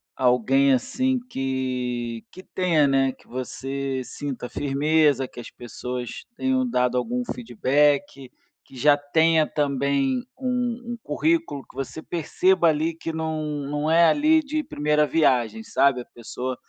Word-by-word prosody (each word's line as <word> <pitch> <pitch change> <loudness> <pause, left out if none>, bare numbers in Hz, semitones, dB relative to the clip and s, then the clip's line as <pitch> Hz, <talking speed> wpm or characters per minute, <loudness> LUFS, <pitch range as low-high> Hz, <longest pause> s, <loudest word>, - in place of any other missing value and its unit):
alguém 130 +2 +3
assim 260 - 0
que 125 - -3
que 185 - -12
tenha, 170 -7 +2
né, 135 -1 +2
que - - -24
você 135 +1 -4
sinta 125 0 -6
firmeza, 145 -1 +1
que - - -12
as 120 - -8
pessoas 125 +1 -6
tenham 260 -1 +1
dado 125 - +1
algum 125 +1 -2
feedback, 135 - 0 0.3
que - - -18
já 145 +3 +5
tenha 160 +2 +2
também 140 - 0
um 245 -2 -2
um 235 - -6
currículo 320 - 0
que - - -18
você 135 +3 -5
perceba 175 +2 +1
ali, 160 +2 0
que 165 0 -5
não 160 -1 -3 0.3
não 150 +1 -1
é 170 +1 +6
ali 310 - +4
de 305 +2 -2
primeira 150 - +1
viagem, 120 -8 +1
sabe, 135 +1 +2
a - - -11
pessoa 125 +2 -6
140 Hz, 140 wpm, -24 LUFS, 130-165 Hz, 0.3 s, é